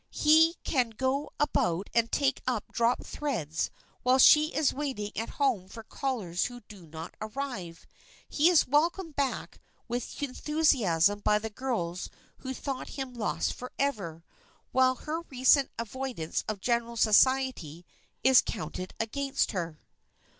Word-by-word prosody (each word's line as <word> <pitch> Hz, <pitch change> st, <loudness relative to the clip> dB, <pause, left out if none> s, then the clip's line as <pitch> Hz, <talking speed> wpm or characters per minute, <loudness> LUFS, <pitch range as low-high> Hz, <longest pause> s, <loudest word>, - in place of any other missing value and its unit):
He 320 Hz, +2 st, +5 dB
can 255 Hz, -6 st, +1 dB
go 265 Hz, +6 st, -1 dB
about 190 Hz, -, +1 dB
and 230 Hz, -1 st, +2 dB
take 275 Hz, -2 st, +1 dB
up 245 Hz, -5 st, -2 dB
dropped 235 Hz, +1 st, +1 dB
threads 175 Hz, -, -2 dB, 0.3 s
while 255 Hz, +1 st, +4 dB
she 300 Hz, +3 st, +7 dB
is 310 Hz, -3 st, +1 dB
waiting 260 Hz, -8 st, -3 dB
at 225 Hz, -, -3 dB
home 250 Hz, -10 st, +1 dB
for 225 Hz, +4 st, -10 dB
callers 215 Hz, -9 st, -2 dB
who 245 Hz, 0 st, -7 dB
do 200 Hz, -5 st, -14 dB
not 160 Hz, +1 st, -8 dB
arrive. 215 Hz, -7 st, -5 dB, 0.4 s
He 305 Hz, +4 st, +3 dB
is 345 Hz, -4 st, +4 dB
welcomed 325 Hz, +4 st, +1 dB
back 280 Hz, -2 st, -2 dB, 0.3 s
with 245 Hz, +4 st, -4 dB
enthusiasm 245 Hz, -, +2 dB
by 210 Hz, 0 st, +2 dB
the 220 Hz, +1 st, -5 dB
girls 205 Hz, -8 st, -3 dB, 0.3 s
who 260 Hz, -, -5 dB
thought 265 Hz, 0 st, -5 dB
him 265 Hz, -2 st, -4 dB
lost 210 Hz, -9 st, -1 dB
forever, 215 Hz, -, -3 dB, 0.5 s
while 255 Hz, 0 st, +4 dB
her 310 Hz, +6 st, -4 dB
recent 260 Hz, +1 st, +4 dB
avoidance 230 Hz, -7 st, -4 dB
of 215 Hz, -3 st, -4 dB
general 235 Hz, 0 st, -1 dB
society 220 Hz, -, +2 dB, 0.4 s
is 260 Hz, 0 st, +7 dB
counted 185 Hz, -3 st, -6 dB
against 275 Hz, +5 st, -1 dB
her. 170 Hz, -5 st, -4 dB
245 Hz, 135 wpm, -29 LUFS, 205-275 Hz, 0.5 s, she